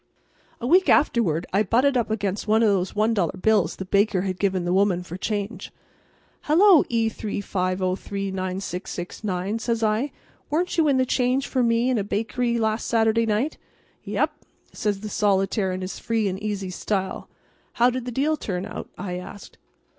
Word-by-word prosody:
A 235 - -5
week 365 +8 +4
afterward 180 - +3
I 200 - +4
butted 250 +7 +2
up 240 -3 +1
against 205 -1 -2
one 220 +2 +4
of 220 - +5 0.2
the - - -11
one 215 +2 +2
dollar 190 -4 0
bills 210 -2 +2
the 190 - -6
baker 200 0 +2
had 185 -2 -3
given 190 -3 0
the 175 - 0
woman 190 -2 +2
for 175 0 -8
change. 205 +2 -4 0.7
"Hallo, 345 +1 +6
E35039669," 190 -2 -3
says 230 -1 -1
I, 220 +6 +1 0.4
"weren't 345 +4 0
you 315 - +4
in 275 -2 +3
the 260 - +3
change 255 +2 +1
for 260 - 0
me 230 0 +2
in 245 - +1
a - - -1
bakery 230 +4 -1
last 220 0 0
Saturday 225 0 +2
night?" 220 +8 0 0.4
"Yep," - - 0 0.4
says 205 -2 -2
the 215 - -5
solitaire 195 -1 +1
in 185 0 -4
his 185 +1 -5
free 225 -2 0
and 190 +1 -3
easy 200 -3 -3
style. 190 +1 -3 0.4
"How 245 +1 +4
did 250 -1 -4
the 250 - -4
deal 295 +6 +1
turn 185 -7 -3
out?" - - -7
I 180 -2 -4
asked. 190 +2 -11
210 Hz, 170 wpm, -24 LUFS, 190-235 Hz, 0.7 s, Hallo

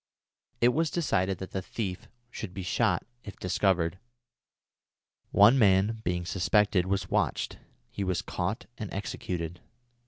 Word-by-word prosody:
It 120 - +6
was 160 +5 +1
decided 95 - 0
that 95 - -7
the 95 - -2
thief 95 -1 -5 0.2
should 95 -7 -7
be 95 - -4
shot 90 - +1 0.2
if 100 - -9
discovered. 90 -1 +1 1.3
One 115 +7 +6
man, 105 +1 +4
being 90 -2 -1
suspected, 95 +2 +2
was 100 +1 -1
watched. - - 0 0.3
He 100 - -3
was 95 -2 -1
caught 95 +6 -3
and 105 -4 -5
executed. 90 -4 -4
95 Hz, 130 wpm, -29 LUFS, 90-105 Hz, 1.3 s, It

